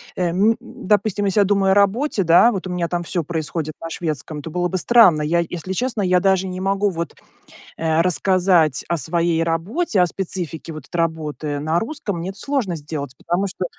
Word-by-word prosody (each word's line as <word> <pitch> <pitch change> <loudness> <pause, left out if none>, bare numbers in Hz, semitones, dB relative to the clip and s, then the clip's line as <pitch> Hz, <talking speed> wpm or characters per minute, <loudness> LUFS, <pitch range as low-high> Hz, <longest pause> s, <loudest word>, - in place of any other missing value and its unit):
эм 185 +5 +2
Допустим, 205 0 -1
если 195 +1 +2
я - - +6
думаю 195 -1 +2
о - - +6
работе, 205 +4 +2
да, 175 +8 +6
вот 190 -4 -4
у - - -6
меня 180 -1 -1
там 175 0 -2
всё 170 0 -2
происходит 160 0 -3
на 165 - -5
шведском, 155 -2 -4
это 155 - -7
было 175 +2 -1
бы 185 - -2
странно. 185 -6 +5
Я 160 +3 +1
если 180 +2 -5
честно, 240 +1 -1
я 180 -1 +3
даже 190 0 +2
не 185 0 -5
могу 195 +1 +1
вот, 170 -2 -5 0.6
э, 160 0 +1
рассказать 180 -4 +2
о 170 - 0
своей 165 +2 +1
работе, 185 - 0
о - - +5
специфике 170 -3 -5
вот 155 -3 -9
это 175 - -6
работы 155 -3 -2
на 155 +3 0
русском. 225 - -4
Мне 170 +3 -4
это 195 +1 -9
сложно 260 -11 -1
сделать, 145 -3 -6
потому 185 +3 -1
что, 185 -1 -4
180 Hz, 200 wpm, -21 LUFS, 165-195 Hz, 0.6 s, я